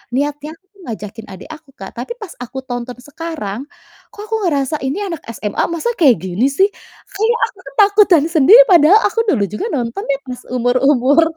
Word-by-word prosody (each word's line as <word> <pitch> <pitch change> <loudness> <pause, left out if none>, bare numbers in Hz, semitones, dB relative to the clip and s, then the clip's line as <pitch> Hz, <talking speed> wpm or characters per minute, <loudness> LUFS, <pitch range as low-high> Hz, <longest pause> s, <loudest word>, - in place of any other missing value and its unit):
Niatnya 295 +3 -3
aku 375 - -37 0.2
ngajakin 220 0 -7
adik 190 - -11
aku 310 -2 -12
Kak, - - -9
tapi 475 - -6
pas 425 -7 -9
aku 250 +2 -8
tonton 245 -1 -6
sekarang 290 -8 -6 0.5
kok 410 - -10
aku 445 +1 -3
ngerasa 290 -1 -1
ini 275 +10 -3
anak 340 -6 -5
SMA 210 -2 -5
masa 340 +8 -2
kayak 275 -9 +5
gini 190 +7 0
sih, 380 +9 +2 0.4
kayak 445 +3 0
aku - - -21
tuh - - -10
takutan 405 -6 +5
sendiri 335 - +7
padahal 345 +2 +6
aku - - 0
dulu 245 - +2
juga 205 - -4
nonton 240 +5 -3
ya 280 - 0
pas 250 -1 -7 0.2
umur-umur 255 +4 +3
285 Hz, 180 wpm, -17 LUFS, 245-350 Hz, 0.5 s, sendiri